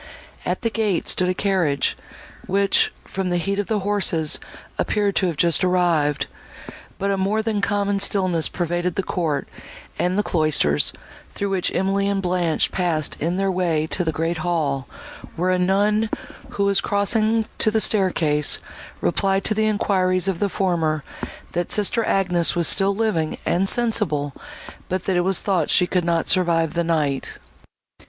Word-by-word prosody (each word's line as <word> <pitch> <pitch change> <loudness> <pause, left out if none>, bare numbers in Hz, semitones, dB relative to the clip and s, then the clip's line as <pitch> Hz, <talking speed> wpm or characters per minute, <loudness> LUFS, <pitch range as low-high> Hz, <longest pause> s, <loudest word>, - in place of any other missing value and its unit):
At - - -2
the 230 - 0
gate 215 -5 -1
stood 180 0 +2
a 185 - 0
carriage, 180 -9 0 0.5
which, 195 +1 +2
from 190 -1 -3
the 175 - +1
heat 195 +3 -1
of 205 - -2
the 215 -2 0
horses, 190 -6 +1 0.4
appeared 205 -2 0
to 185 - +2
have 165 -4 -3
just 170 +3 +2
arrived; 165 -6 +2 0.7
but 200 +1 -1
a 195 - 0
more 205 +3 0
than 215 -2 -1
common 200 0 0
stillness 185 -5 +1
pervaded 175 0 -2
the 195 - -1
court 155 -7 -2 0.5
and 180 +2 0
the 210 - +2
cloisters, 155 - +2 0.4
through 200 -1 -2
which 190 -2 0
Emily 195 +2 +1
and 200 -1 0
Blanche 175 -3 0
passed 170 -5 -1
in 170 +4 -1
their 195 0 +1
way 170 -4 0
to 180 - +1
the 160 - 0
great 165 +2 -2
hall, 155 -5 -1 0.5
where 180 +2 0
a 185 - +1
nun, 205 +4 +2 0.4
who 200 - -2
was 200 -1 +2
crossing 215 +2 +1
to 220 - +4
the 220 +1 +1
staircase, 165 -9 +2 0.4
replied 195 - +1
to - - +1
the 215 0 +1
enquiries 185 -3 +1
of 190 -3 -1
the 205 - 0
former, 165 -6 0 0.5
that 175 0 -2
sister 215 +3 +2
Agnes 180 -4 +2
was 170 -1 +2
still 195 0 +3
living, 200 -8 -1
and 190 +3 +1
sensible, 185 - 0 0.6
but 185 0 -2
that 190 - 0
it 175 - +3
was 190 +1 +1
thought 185 -6 0
she 180 - +4
could 180 0 0
not 170 -1 0
survive 170 -3 +2
the 170 0 0
night. 150 -5 -1
185 Hz, 165 wpm, -22 LUFS, 165-200 Hz, 0.7 s, to